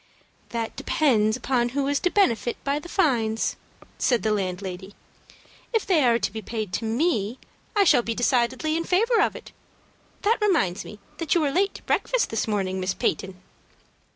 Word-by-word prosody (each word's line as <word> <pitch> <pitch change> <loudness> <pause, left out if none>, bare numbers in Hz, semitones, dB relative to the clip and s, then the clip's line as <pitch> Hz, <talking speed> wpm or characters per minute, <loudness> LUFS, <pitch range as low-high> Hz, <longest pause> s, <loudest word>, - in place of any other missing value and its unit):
"That 230 -1 -3
depends 220 -7 +2
upon 245 -2 0
who 280 - +1
is 285 0 +1
to 360 - +1
benefit 245 - +1
by 280 +1 0
the 345 - -11
fines," 235 - +1 0.4
said 245 -3 +2
the 220 - +1
landlady. 190 -1 -4 0.8
"If 450 - +1
they 340 -7 +3
are 235 -2 +4
to 225 - -2
be 220 +1 -6
paid 215 -3 -5
to 225 - -2
me, 230 - 0 0.4
I 410 - +5
shall 290 -9 +5
be 230 -1 -3
decidedly 250 +5 +1
in 335 - 0
favor 440 +6 +2
of - - +1
it. - - -10 0.7
That 450 +3 +2
reminds 310 - +1
me 210 - -10 0.2
that 330 -1 0
you 340 - +3
were 290 -2 +1
late 390 +6 +1
to - - -10
breakfast - - 0
this 225 - -1
morning, 190 -3 -1
Miss 185 0 -1
Peyton." 185 +3 -2
240 Hz, 180 wpm, -25 LUFS, 215-320 Hz, 0.8 s, I